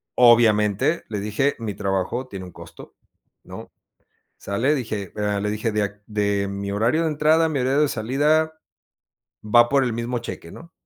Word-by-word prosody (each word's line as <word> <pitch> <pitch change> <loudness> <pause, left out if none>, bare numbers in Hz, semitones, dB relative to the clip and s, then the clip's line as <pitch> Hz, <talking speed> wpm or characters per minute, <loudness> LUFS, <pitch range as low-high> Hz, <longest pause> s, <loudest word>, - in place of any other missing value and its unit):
Obviamente, 115 - +4
le 105 -2 -3
dije, 105 +8 0
mi 110 -3 -4
trabajo 100 +6 -2
tiene 95 -6 -8
un 90 - -11
costo, - - -13 0.5
¿no? - - -11 0.7
¿Sale? 115 +10 0
Dije, 110 - -4
eh, 105 -1 -1
le 105 +1 -1
dije: 110 +1 -2
"De 105 -1 -2
de 100 -2 -1
mi 100 0 -5
horario 115 +10 +1
de 165 - +1
entrada 155 +2 +3
a - - -1
mi 155 -3 -2
horario 135 +3 +2
de 150 - +2
salida 150 +7 0 0.8
va 120 +2 +4
por 140 -1 +2
el 125 - -1
mismo 120 +1 -3
cheque", 85 - -8
¿no?, 170 0 -13
115 Hz, 170 wpm, -22 LUFS, 105-140 Hz, 0.8 s, Obviamente